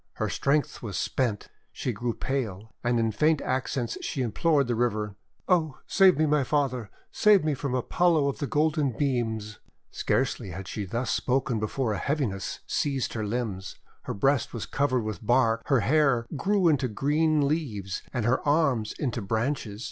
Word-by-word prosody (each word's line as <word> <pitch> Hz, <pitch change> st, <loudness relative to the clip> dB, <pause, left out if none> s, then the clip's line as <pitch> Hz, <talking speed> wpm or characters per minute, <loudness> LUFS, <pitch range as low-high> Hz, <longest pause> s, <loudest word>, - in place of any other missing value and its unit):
Her -, -, -2 dB
strength 145 Hz, +1 st, 0 dB
was 100 Hz, -7 st, -4 dB
spent, 110 Hz, +1 st, -1 dB, 0.2 s
she 125 Hz, -, -3 dB
grew 120 Hz, +3 st, -3 dB
pale, 110 Hz, -6 st, -3 dB
and 120 Hz, -1 st, +2 dB
in 115 Hz, -1 st, +1 dB
faint 155 Hz, +6 st, +2 dB
accents 130 Hz, -2 st, -2 dB
she 135 Hz, -, -2 dB
implored 140 Hz, +5 st, +2 dB
the 120 Hz, -, -1 dB
river: 110 Hz, -3 st, -1 dB, 0.2 s
— -, -, -43 dB
"Oh, 160 Hz, -7 st, +2 dB
save 190 Hz, -5 st, +5 dB
me, 155 Hz, -, +3 dB
my 150 Hz, -2 st, +2 dB
Father, 130 Hz, -6 st, -1 dB, 0.2 s
save 210 Hz, -4 st, +5 dB
me 155 Hz, -, +2 dB
from 135 Hz, -1 st, -2 dB
Apollo 160 Hz, +3 st, +2 dB
of 140 Hz, -, -5 dB
the 145 Hz, -, -2 dB
Golden 150 Hz, -4 st, +1 dB
Beams! 115 Hz, -6 st, -1 dB, 0.2 s
>: -, -, -47 dB
Scarcely 125 Hz, -5 st, -1 dB
had 90 Hz, +2 st, -7 dB
she 105 Hz, +3 st, -4 dB
thus 115 Hz, +7 st, -2 dB
spoken 125 Hz, -3 st, 0 dB
before 110 Hz, +2 st, -1 dB
a -, -, -3 dB
heavi 145 Hz, 0 st, 0 dB
ness 95 Hz, -1 st, -5 dB
seized 135 Hz, -3 st, -1 dB
her 110 Hz, -, -2 dB
limbs. 105 Hz, -3 st, -3 dB, 0.3 s
Her -, -, -3 dB
breast 135 Hz, +4 st, +1 dB
was 115 Hz, -, -4 dB
covered 130 Hz, -4 st, 0 dB
with 110 Hz, 0 st, -5 dB
bark, 115 Hz, -1 st, +3 dB
her 135 Hz, -5 st, +3 dB
hair 135 Hz, -3 st, +3 dB
grew 195 Hz, +4 st, +2 dB
into 145 Hz, -5 st, +3 dB
green 150 Hz, +5 st, +1 dB
leaves 110 Hz, -, -2 dB
and 120 Hz, -4 st, -2 dB
her 125 Hz, +2 st, +2 dB
arms 140 Hz, -8 st, +2 dB
into 125 Hz, -5 st, -2 dB
branches. 110 Hz, +1 st, -2 dB
130 Hz, 180 wpm, -27 LUFS, 110-145 Hz, 0.3 s, save